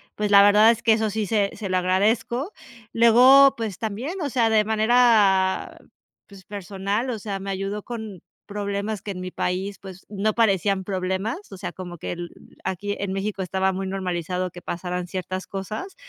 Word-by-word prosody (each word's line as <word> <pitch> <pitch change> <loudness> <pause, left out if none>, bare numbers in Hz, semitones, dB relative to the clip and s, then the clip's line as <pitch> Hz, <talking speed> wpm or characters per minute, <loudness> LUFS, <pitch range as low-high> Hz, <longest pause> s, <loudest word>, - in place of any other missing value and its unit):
pues 210 -1 -2
la 200 - +9
verdad, 210 +3 +7
es 230 - -3
que 225 - +5
eso 220 -1 0
sí 215 +1 -2
se 200 0 +1
se 205 - -5
lo 185 - -1
agradezco. 220 - 0 0.4
Luego, 255 +4 +7
pues 220 -5 -4
también, 245 - -4
o 290 - -1
sea, 235 -3 +2
de 220 -1 +4
manera, 215 -4 +3 0.5
pues, 195 -2 -15
personal. 200 +4 -3
O 225 -3 -3
sea, 200 -1 -4
me 195 +1 -6
ayudó 195 +2 -3
con 220 -7 -7 0.2
problemas 200 0 -3
que 205 - -5
en 185 - -6
mi 185 0 -6
país, 190 +2 -3
pues, 190 -1 -11
no 210 +1 -1
parecían 195 -3 +2
problemas. 190 - -3
O 195 - -8
sea, - - -6
como 175 -2 -8
que - - -5
el 175 0 -6 0.3
aquí 195 +2 -3
en 195 -1 -3
México 195 0 -3
estaba 190 +1 0
muy 190 0 -3
normalizado 180 -1 -3
que 175 0 -11
pasaran 180 0 -4
ciertas 185 0 -5
cosas, 215 - -6
200 Hz, 185 wpm, -23 LUFS, 190-220 Hz, 0.5 s, la